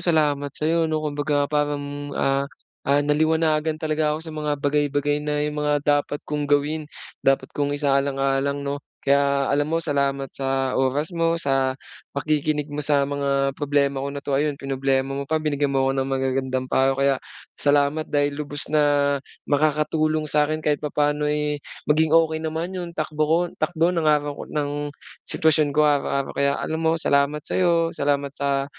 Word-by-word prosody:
salamat 150 -4 +1
sa'yo 165 +1 +1
'no. 155 -1 -1
Kumbaga, 145 -1 0
parang, 145 -1 -2
ah, 135 0 +1 0.4
ah, 140 +1 +4
naliwanagan 155 +1 +2
talaga 155 -1 0
ako 160 - -8
sa 160 - -7
mga 150 -1 -2
bagay-bagay 145 0 0
na 150 0 -1
'yong 150 - -2
mga 150 0 +1
dapat 145 0 +1
kong 150 -1 -3
gawin, 150 +1 +1 0.3
dapat 135 0 +1
kong 145 0 -1
isaalang-alang 140 0 0
'no. 140 0 -3 0.2
Kaya 140 0 +2
alam 145 +1 +1
mo, 165 +1 -1
salamat 140 -2 -1
sa 135 -1 -1
oras 145 +6 0
mo 165 0 +1
sa 135 -4 0 0.4
pakikinig 150 +1 0
mo 145 - -3
sa 145 -1 +2
mga 140 -1 0
problema 140 -1 0
ko 140 - -3
na 140 0 -5
'to. 140 - -2
Ayun, 145 +1 +1
pinroblema 135 0 -1
mo 140 0 -4
pa, 160 - +1
binigyan 145 -3 0
mo 135 - +3
ako 135 - +2
ng 135 - -2
magagandang 130 -1 -1
payo 135 +1 +2
kaya 140 0 +3 0.5
salamat 145 +2 +2
dahil 145 0 +1
lubos 145 0 -5
na 145 -2 +3 0.3
makakatulong 155 +1 +1
sa 150 0 +1
akin 155 0 -3
kahit 150 -1 +1
papaano, 150 0 0
eh, 150 0 -1 0.2
maging 155 +1 +3
okey 160 -1 +2
naman 160 +3 -3
'yon 175 -2 -6
takbo 155 0 0
ko 160 - +4 0.2
takbo 175 0 +1
ng 165 -3 +1
araw 145 -1 +2
ko - - -4
ng 145 0 -2 0.4
sitwasyon 155 -1 +3
ko 150 - +5
araw-araw. 140 -2 +1
Kaya 140 0 +1
alam 160 0 -3
mo, 165 0 +2
salamat 145 -1 +1
sa'yo. 170 -2 +1
Salamat 140 -2 0
sa 140 -1 0
145 Hz, 170 wpm, -23 LUFS, 140-155 Hz, 0.5 s, ko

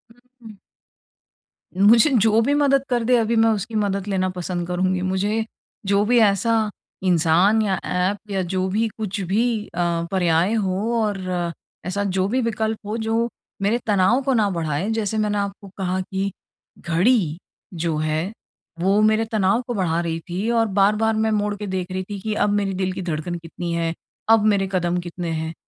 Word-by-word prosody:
उ, - - -25 0.2
हुँ। 215 -3 -12 1.2
मुझे 215 +7 +6
जो 220 +1 +4
भी 275 +5 +1
मदद 275 -2 +3
कर 240 -2 +1
दे 250 +2 +3
अभी 230 0 +1
मैं 225 0 +4
उसकी 215 +2 -4
मदद 200 -2 -1
लेना 190 -2 0
पसंद 175 -1 -3
करुँगी। 185 +1 0
मुझे 200 +4 0 0.4
जो 200 +1 +3
भी 240 +2 +4
ऐसा 220 +1 +3 0.3
इंसान 180 +4 +3
या 200 -3 +1
ऐप 200 +3 -2
या 195 -1 0
जो 185 0 0
भी 220 +4 +1
कुछ 210 -3 -3
भी 215 +4 0
अ, 170 -1 -1
पर्याय 175 +1 +2
हो 205 +1 0
और 205 -2 -1 0.7
ऐसा 195 +3 -1
जो 190 -1 0
भी 255 +5 0
विकल्प 220 -1 -1
हो 210 +2 -3
जो 225 +1 +1 0.3
मेरे 205 +4 +2
तनाव 205 +5 +3
को 270 0 +1
ना 215 -4 +2
बढ़ाए। 165 +1 -2
जैसे 220 -1 -1
मैंने 210 -1 0
आपको 200 0 -4
कहा 185 -1 -1
कि 190 +1 -3 0.5
घड़ी 170 -1 +2 0.4
जो 165 -2 -1
है 155 +4 -1 0.5
वो 195 +4 +3
मेरे 215 +1 +3
तनाव 215 +1 +2
को 245 - -2
बढ़ा 175 -6 0
रही 165 -1 -2
थी 190 +6 -2
और 230 -1 +3
बार-बार 210 +3 +2
मैं 220 0 +1
मोड़ 210 -1 0
के 205 0 -6
देख 185 -1 -3
रही 185 0 -2
थी 205 -1 -5
कि 215 +3 -3
अब 210 - +1
मेरे 205 -1 0
दिल 185 0 -1
की 190 - -5
धड़कन 175 0 -3
कितनी 170 +1 -6
है? 165 -1 -1 0.4
अब 225 -1 +6
मेरे 200 -2 +2
कदम 175 -2 0
कितने 175 0 -5
हैं? 160 0 -3
200 Hz, 180 wpm, -22 LUFS, 180-220 Hz, 1.2 s, मुझे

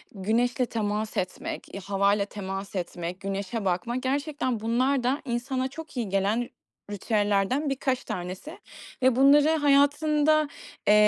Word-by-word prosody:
güneşle 230 +5 +1
temas 215 -1 -2
etmek, 185 0 -4
eee, 195 - -5
havayla 200 +1 +1
temas 195 -1 -6
etmek, 175 0 -4
güneşe 195 +2 -3
bakmak, 215 +8 -1
gerçekten 280 -2 -1
bunlar 250 +4 +1
da 260 +4 +1
insana 255 +1 -1
çok 305 0 -10
iyi 230 -4 -1
gelen 200 +5 0 0.4
ritüellerden 205 +6 +1
birkaç 265 -1 -1
tanesi 185 - -6 0.4
ve 260 -1 +4
bunları 285 +3 +6
hayatında, 295 +1 +3 0.4
eee, 210 - +7
235 Hz, 125 wpm, -27 LUFS, 200-275 Hz, 0.4 s, eee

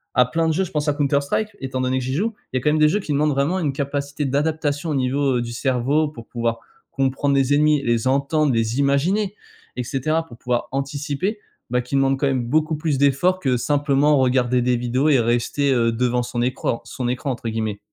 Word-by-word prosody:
à 125 - +5
plein 165 +6 0
de 160 - +2
jeux, 190 +5 +1
je 180 - -6
pense 150 0 -2
à 150 - +3
Counter 140 -1 +1
Strike, 205 +10 -1
étant 130 -1 -3
donné 130 0 0
que - - -4
j'y 130 +1 -3
joue, 215 +10 0 0.2
il 130 - -1
y - - +1
a - - -9
quand 150 - +2
même 155 - +1
des 155 0 +5
jeux 205 - +1
qui 175 - -5
demandent 150 +2 +2
vraiment 145 +7 0
une 155 -6 0
capacité 140 +1 -3
d'adaptation 145 +2 -1
au 150 - 0
niveau, 135 0 +1
heu, - - 0
du 120 0 -5
cerveau 135 +5 +1
pour 120 -6 -11
pouvoir 115 -1 -2 0.3
comprendre 135 +1 0
les 135 0 +2
ennemis, 150 0 +3
les 120 +1 +1
entendre, 140 +2 +2
les 115 +2 0
imaginer 180 +9 +1 0.4
et 125 - -2
cetera, 155 +6 -1
pour 120 - -13
pouvoir 125 0 -2
anticiper, 145 - -2 0.3
bah, 125 +1 +1
qui 125 +3 -11
demandent 135 0 +2
quand 140 - +1
même 130 -2 0
beaucoup 155 +4 +1
plus 150 -2 -1
d'efforts 140 +7 +2
que 130 -7 +1
simplement 145 +2 +2
regarder 125 -1 +2
des 125 0 +2
vidéos 125 +5 0
et 140 -4 +4
rester, 120 +4 +1
heu, 115 -2 +2
«devant 125 +1 0
son 120 0 -3
écran 120 -1 -1
son 120 +2 -4
écran», 125 +3 -2
entre 120 -2 -5
guillemets. 110 -2 -3
140 Hz, 230 wpm, -22 LUFS, 125-150 Hz, 0.4 s, à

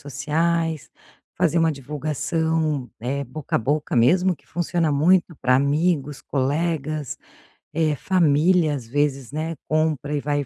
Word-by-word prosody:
sociais, 155 +1 -1 0.5
fazer 165 +2 +2
uma 165 -1 +3
divulgação, 150 0 -2
eh, 135 +5 -2
boca 140 +3 -7
a - - +5
boca 145 +6 -1
mesmo 180 +10 +4
que - - -27
funciona 170 -2 0
muito 170 +3 +3
pra 130 0 +3
amigos, 145 0 +1
colegas, 150 +1 -2 0.6
eh, 155 -3 +1
família 170 -1 +3
às 125 -5 -5
vezes, 140 0 -1
né, 160 +2 -3
compra 155 -2 0
e 145 - -1
vai 145 -1 -1
150 Hz, 130 wpm, -23 LUFS, 140-165 Hz, 0.6 s, a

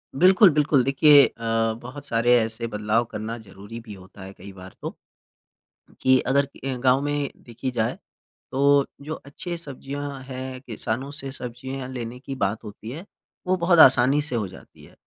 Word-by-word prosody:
बिल्कुल, 185 +5 +7
बिल्कुल। 150 -3 +3
देखिए 140 +1 +6
अ, 115 - -13 0.4
बहुत 130 +4 -9
सारे 120 -1 +2
ऐसे 115 +1 -2
बदलाव 110 +2 0
करना 110 +1 -5
ज़रूरी 105 +1 -10
भी 105 - -8
होता 95 0 -14
है 95 +1 -9
कई 100 +2 -12
बार 95 0 -12
तो। - - -5 1.1
कि 130 0 +5
अगर 140 +2 +2
अ, 135 -1 -6
गाँव 130 +1 +3
में 145 -1 -1
देखी 120 +2 -6
जाए 115 -2 -1 0.5
तो 140 +1 +4 0.2
जो 155 +2 -4
अच्छे 170 +5 -7
सब्जियाँ 140 -2 -6
हैं 130 0 -6
किसानों 125 +2 -4
से 140 -2 -6
सब्जियाँ 130 +1 -6
लेने 125 -1 -6
की 135 0 -6
बात 105 -2 -2
होती 105 +1 -9
है 155 +8 -7 0.4
वो 185 - +2
बहुत 170 0 +3
आसानी 135 0 +6
से 145 -4 -1
हो 105 -3 -1
जाती 95 - -15
है। - - -17
130 Hz, 170 wpm, -24 LUFS, 115-140 Hz, 1.1 s, बिल्कुल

